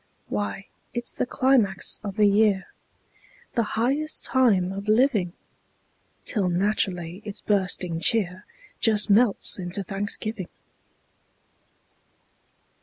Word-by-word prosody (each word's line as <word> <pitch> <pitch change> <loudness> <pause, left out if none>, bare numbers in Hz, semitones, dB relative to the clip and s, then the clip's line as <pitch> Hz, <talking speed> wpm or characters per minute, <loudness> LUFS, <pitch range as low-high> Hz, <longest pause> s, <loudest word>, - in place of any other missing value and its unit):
Why, 105 - -3 0.3
it's 240 0 -3
the - - -2
climax 250 -7 +2
of 200 -2 -5
the 210 -1 +4
year, 200 -1 +3 0.9
The 230 -2 -1
highest 280 +7 0
time 205 -9 +3
of 200 +2 -6
living! 215 -6 +2 0.9
Till 195 -5 0
naturally 180 -1 -1
its 205 -2 -6
bursting 185 -4 0
cheer 185 0 +1 0.4
Just 210 -2 +3
melts 210 -1 +3
into 180 +2 -3
thanksgiving. 200 0 -2
205 Hz, 100 wpm, -25 LUFS, 185-225 Hz, 0.9 s, the